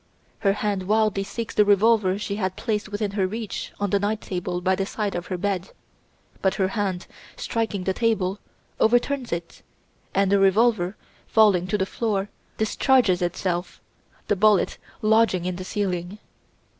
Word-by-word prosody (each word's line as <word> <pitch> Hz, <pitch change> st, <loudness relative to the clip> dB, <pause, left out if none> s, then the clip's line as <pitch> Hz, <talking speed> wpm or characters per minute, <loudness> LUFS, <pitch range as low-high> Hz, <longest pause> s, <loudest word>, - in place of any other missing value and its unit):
Her 195 Hz, -1 st, +2 dB
hand 200 Hz, -2 st, -2 dB
wildly 215 Hz, -2 st, +2 dB
seeks 230 Hz, +3 st, -5 dB
the 210 Hz, -, +5 dB
revolver 205 Hz, -1 st, +3 dB
she 200 Hz, -1 st, -4 dB
had 185 Hz, -3 st, -2 dB
placed 210 Hz, -3 st, -2 dB
within 205 Hz, -1 st, -2 dB
her 195 Hz, -2 st, 0 dB
reach 220 Hz, +2 st, -5 dB
on 205 Hz, -2 st, -1 dB
the 200 Hz, -, +3 dB
night 205 Hz, +2 st, -1 dB
table 180 Hz, -2 st, -3 dB
by 185 Hz, +1 st, +1 dB
the 195 Hz, -, 0 dB
side 210 Hz, -2 st, -2 dB
of 175 Hz, 0 st, -4 dB
her 185 Hz, -, -3 dB
bed, 190 Hz, -1 st, -2 dB, 0.7 s
but 190 Hz, -, +2 dB
her 190 Hz, -1 st, +1 dB
hand, 195 Hz, -3 st, -2 dB, 0.3 s
striking 225 Hz, -5 st, -2 dB
the 190 Hz, -, 0 dB
table, 205 Hz, -3 st, 0 dB, 0.4 s
overturns 245 Hz, +3 st, +2 dB
it, 170 Hz, 0 st, -5 dB, 0.5 s
and 195 Hz, 0 st, +3 dB
the 200 Hz, -, +4 dB
revolver, 195 Hz, -1 st, +3 dB, 0.3 s
falling 200 Hz, -5 st, +4 dB
to 210 Hz, -, 0 dB
the 190 Hz, -, 0 dB
floor, 205 Hz, -1 st, -2 dB, 0.3 s
discharges 220 Hz, -3 st, +3 dB
itself, 175 Hz, 0 st, -2 dB, 0.5 s
the 205 Hz, -, +2 dB
bullet 205 Hz, -1 st, +3 dB, 0.2 s
lodging 215 Hz, -4 st, +3 dB
in 180 Hz, -1 st, -2 dB
the 185 Hz, -, -5 dB
ceiling. 185 Hz, -1 st, -3 dB
200 Hz, 160 wpm, -24 LUFS, 185-215 Hz, 0.7 s, the